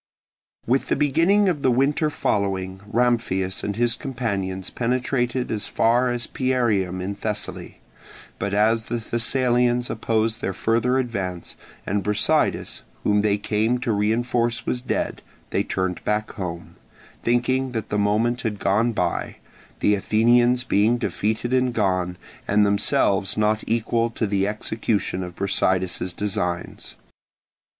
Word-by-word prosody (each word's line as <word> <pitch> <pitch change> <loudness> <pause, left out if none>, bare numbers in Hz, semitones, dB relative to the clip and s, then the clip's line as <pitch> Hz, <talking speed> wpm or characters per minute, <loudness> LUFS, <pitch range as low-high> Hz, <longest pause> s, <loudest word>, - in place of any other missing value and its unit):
With 130 +3 +1
the - - +1
beginning 165 +9 +3
of 165 -6 0
the 130 - +3
winter 140 +5 +2
following, 95 -9 -1
Ramphias 115 -6 +1
and 100 - -2
his 120 +1 +2
companions 100 -8 -3
penetrated 125 0 -1
as 105 -3 -2
far 120 +2 +2
as 120 0 -2
Pierium 110 -9 0
in 100 +2 -3
Thessaly; 105 +1 -5 0.6
but 100 - -2
as 110 +2 +2
the 120 - -3
Thessalians 120 +1 +1
opposed 110 +1 0
their 95 - -2
further 120 +4 +1
advance, 95 -9 -3 0.3
and 100 +1 0
Brasidas 105 +1 +1 0.2
whom 105 0 +3
they 105 -1 +2
came 110 +4 0
to 120 - 0
reinforce 115 +3 0
was 125 - -1
dead, 125 - -2 0.3
they - - +1
turned 95 -1 -2
back 105 0 -1
home, 85 -5 -6 0.4
thinking 130 +2 +1
that 110 -2 -3
the 105 - 0
moment 110 +5 +1
had 110 -3 -2
gone 110 +5 +1
by, 90 -5 -1 0.5
the 105 - +4
Athenians 120 +4 +3
being 110 0 +2
defeated 115 +1 -1
and 125 -1 +2
gone, 90 -4 0 0.3
and 105 +1 +4
themselves 100 -1 +2
not 110 0 +1
equal 115 +1 +1
to 115 0 -2
the 100 -1 +1
execution 105 -2 -1
of 90 -1 -6
Brasidas's 95 -2 0
designs. 90 -3 -3
110 Hz, 135 wpm, -23 LUFS, 100-120 Hz, 0.6 s, the